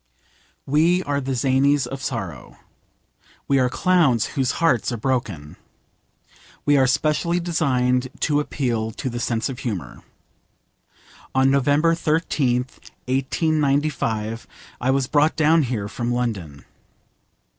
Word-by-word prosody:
We 165 +6 +2
are 140 -2 -1
the 135 0 -2
zanies 135 +2 +2
of 135 +2 -7
sorrow. 95 - -5 0.9
We 140 -1 +3
are 125 -1 +2
clowns 160 - +2
whose 135 -3 0
hearts 165 -9 +1
are 120 - -3
broken. 105 - -3 1.1
We 145 - +4
are 135 -1 +4
specially 155 +6 +1
designed 130 -7 +1
to 145 -2 +2
appeal 120 -7 -2
to 130 - -4
the 120 - -4
sense 115 -1 -1
of 135 -2 -6
humour. 105 -8 -5 1.3
On 130 0 +4
November 145 +4 +3
13th, 150 -6 0 0.3
1895, 135 -4 0 0.3
I 125 - 0
was 135 0 +2
brought 150 +3 +2
down 160 +1 +4
here 120 -7 -2
from 120 +3 -3
London. 100 - -3
130 Hz, 120 wpm, -22 LUFS, 120-150 Hz, 1.3 s, We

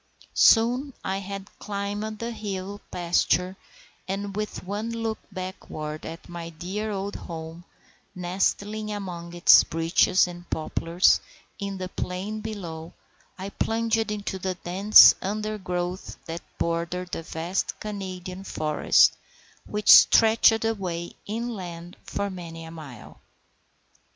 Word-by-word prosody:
Soon 250 +4 +4
I 190 +1 -1
had 195 0 -7
climbed 205 +1 -4
the 230 +2 -4
hill 200 -2 -5
pasture, 180 +1 +1 0.5
and 195 +1 -3
with 210 0 -4
one 205 +4 -3
look 225 -1 -3
backward 155 -5 -6
at 165 +2 -9
my 170 -1 -7
dear 185 +6 -4
old 200 0 -3
home, 165 +1 -8 0.5
nestling 200 +4 -1
among 175 -4 -6
its 175 - +8
beeches 165 +3 +3
and 175 0 -9
poplars 165 +3 +2 0.4
in 200 -1 -4
the 185 -1 -4
plain 185 +4 -4
below, 175 -7 -6 0.4
I 190 +1 -5
plunged 225 +1 0
into 200 -2 -4
the 185 0 -2
dense 190 +5 +7
undergrowth 190 -3 -3
that 165 +1 -5 0.2
bordered 170 +2 -2
the - - -3
vast 165 +3 -3
Canadian 190 -3 -6
forest, 155 -5 +3 0.5
which 210 0 +3
stretched 225 0 +7
away 180 -6 -2
inland 190 -6 -5
for 200 0 -3
many 165 -3 -8
a 160 - -9
mile. 145 -8 -11
190 Hz, 115 wpm, -26 LUFS, 175-210 Hz, 0.5 s, its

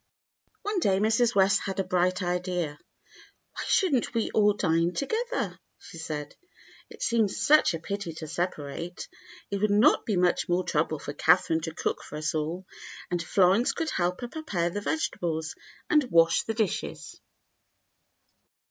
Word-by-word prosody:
One 415 -2 -1
day 195 - +2
Mrs. 225 +3 +2
West 195 0 +4
had 195 0 -3
a - - +2
bright 185 +1 +1
idea. 175 -4 -2 0.7
"Why - - -5
should 370 -6 +3
n't 245 -1 0
we 230 - 0
all 210 -1 +4
dine 170 -3 +1
together.^" 465 - -2 0.2
she 165 - -12
said. 150 -2 -5 0.5
"It - - -8
seems 225 -4 +1
such 305 - +4
a - - -5
pity 200 0 -4
to 160 0 -7
separate. 170 +1 -4 0.4
It 200 - 0
would 215 - +2
not 215 +9 +4
be 210 - +1
much 180 0 +1
more 175 +1 +2
trouble 155 -1 0
for 145 0 -7
Catherine 160 +1 +3
to 160 0 -5
cook - - -2
for - - -9
us 155 +1 -2
all, 160 +4 -3 0.5
and 175 -1 0
Florence 190 +7 +3
eould 325 -2 -2
help 180 0 -1
her 245 - -3
prepare 205 - -2
the 205 - -4
vegetables 170 - -2 0.3
and 300 -1 +4
wash 165 -2 +4
the 225 - -3
dishes." 215 -5 -3
185 Hz, 160 wpm, -27 LUFS, 165-220 Hz, 0.7 s, West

